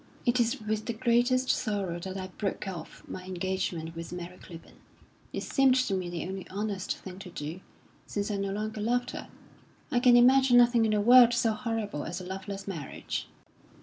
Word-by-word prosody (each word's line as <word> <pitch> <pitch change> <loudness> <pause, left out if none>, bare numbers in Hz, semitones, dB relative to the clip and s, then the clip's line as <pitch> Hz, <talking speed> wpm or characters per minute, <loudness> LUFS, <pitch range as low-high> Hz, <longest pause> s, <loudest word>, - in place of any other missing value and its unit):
"It 245 0 +3
is 235 +3 +1
with 215 0 -3
the 235 - -1
greatest 245 +2 +2
sorrow 200 -7 -1
that 190 +2 -6
I 190 - -4
broke 200 -2 -2
off 175 -4 -7
my 185 - -7
engagement 180 -3 -3
with 165 0 -7
Mary 180 0 -7
Clibborn. 165 -2 -13 0.5
It - - -4
seemed 270 -2 +4
to 255 -6 +1
me 185 -2 -2
the 175 -1 -4
only 190 0 -6
honest 200 -1 -3
thing 185 0 -10
to 195 -2 -9
do 160 +1 -6 0.5
since 205 +1 -2
I 205 - -1
no 200 0 -2
longer 215 +2 -3
loved 245 +3 0
her. - - -7 0.6
I 245 - +3
can 245 -1 +6
imagine 255 0 +6
nothing 240 -1 +5
in 220 - +1
the 210 - +2
world 240 +1 +8
so 230 -2 +2
horrible 215 -8 -3
as 175 +2 -4
a 180 - -8
loveless 195 +1 -6
marriage." 165 -8 -5
205 Hz, 190 wpm, -29 LUFS, 185-240 Hz, 0.6 s, world